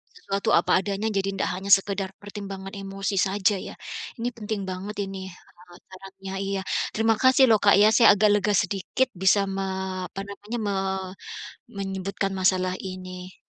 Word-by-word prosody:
sesuatu 195 0 -2
apa 175 - +3
adanya. 200 +2 -2
Jadi, 195 -1 0
tidak - - -1
hanya 195 +2 -4
sekedar 195 0 -3
pertimbangan 195 -2 -7
emosi 195 0 -4
saja 200 +1 +2
ya. - - -8 0.4
Ini 235 - -1
penting 215 -2 -3
banget 190 +3 -5
ini 195 0 -6 0.4
saran-sarannya, 190 +2 -12
iya. 195 0 -1 0.4
Terima 225 +1 +3
kasih 260 +1 +6
lho - - +7
Kak 200 - +7
ya, 210 - +7
saya 230 - +7
agak 210 +1 +4
lega 205 +1 +1
sedikit 200 +7 0
bisa 190 +2 +5 0.2
me 195 - -1 0.4
apa 195 - -7
namanya 210 +3 -6
me 200 - 0 1.1
menyebutkan 195 0 -3
masalah 185 -1 +2
ini. 185 -1 -8
195 Hz, 150 wpm, -25 LUFS, 190-205 Hz, 1.1 s, lho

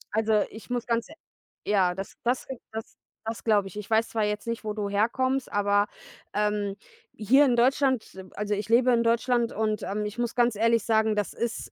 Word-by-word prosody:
Also 220 -1 +3
ich 220 - -12
muss 245 -1 -2
ganz 235 +2 -1
e - - -11 0.6
ja, 185 -3 +3
das 195 0 -7
das 245 +2 0 0.3
das 220 0 -7 0.3
das 225 0 -5
glaube 205 -3 +3
ich. 190 - -10
Ich 210 0 -7
weiß 225 +1 +2
zwar 220 -2 -1
jetzt 210 +1 -2
nicht, 230 0 -3
wo 210 - -2
du 205 -1 -3
herkommst, 260 +6 0
aber, 205 0 +2 0.5
ähm, 210 -1 0 0.4
hier 265 +7 +5
in 250 - +3
Deutschland 260 0 +2
ähm, 190 -1 -11
also 210 0 -2
ich 205 +2 -3
lebe 245 +2 +5
in 235 -1 +3
Deutschland 235 0 +1
und, 215 -1 -1
ähm, 210 +2 -2
ich 210 +2 -6
muss 240 -1 -1
ganz 240 -2 +3
ehrlich 230 0 +3
sagen, 220 -1 +2
das 205 -2 -1
ist 235 -1 -4
220 Hz, 205 wpm, -27 LUFS, 210-235 Hz, 0.6 s, hier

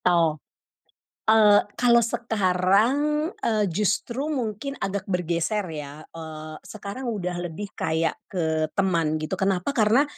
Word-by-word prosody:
Tao. 165 -4 +3 0.8
Ale 215 -2 +6 0.2
kalau 235 -1 +5
sekarang, 205 0 +2 0.4
eee, 215 -2 +1
justru 215 - 0
mungkin 255 -2 -3
agak 195 0 -3
bergeser 180 +3 0
ya, 150 0 -7
eee, 155 -1 -8
sekarang 215 +5 -7
udah 180 -5 -2
lebih 195 +5 -7
kayak 160 0 0
ke 160 -4 0
teman 170 -5 +1
gitu 155 - -5
kenapa 190 +2 +1
karena, 230 +1 +4
195 Hz, 120 wpm, -25 LUFS, 165-220 Hz, 0.8 s, Ale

